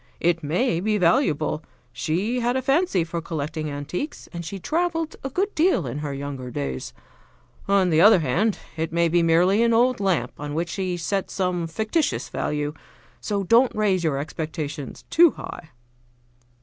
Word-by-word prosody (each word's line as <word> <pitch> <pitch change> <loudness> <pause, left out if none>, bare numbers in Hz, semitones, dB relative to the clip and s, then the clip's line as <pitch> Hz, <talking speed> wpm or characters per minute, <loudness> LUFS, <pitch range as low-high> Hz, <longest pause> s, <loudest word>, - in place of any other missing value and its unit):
It 170 0 +1
may 170 - 0
be 210 +3 +1
valuable; 160 -4 +2 0.3
she 180 - -1
had 245 +2 +1
a - - 0
fancy 270 - +2
for 165 +1 -4
collecting 155 -1 -4
antiques, 145 - -5
and 170 0 -5
she 180 +5 -6
traveled 330 - -1
a 270 - -3
good 390 +9 -1
deal 350 +4 +2
in 145 - -4
her 150 -1 -4
younger 140 -2 -5
days. 70 - -4 0.8
On 195 -2 +3
the 160 +1 +4
other 210 +2 +8
hand, 175 - +1 0.2
it 160 0 -2
may 170 0 +2
be 170 +1 +3
merely 175 +6 +4
an 235 0 +3
old 245 +1 +3
lamp 175 - +1
on 145 0 -5
which 170 +2 -1
she 185 0 -2
set 195 +3 -2
some 180 -3 -1
fictitious 220 - -1
value. 150 0 -2 0.5
So 200 -2 -2
don't 235 +6 +4
raise 200 -4 +1
your 155 -4 +1
expectations 150 -1 -5
too 335 -1 +6
high." 160 - -9
175 Hz, 165 wpm, -24 LUFS, 155-220 Hz, 0.8 s, other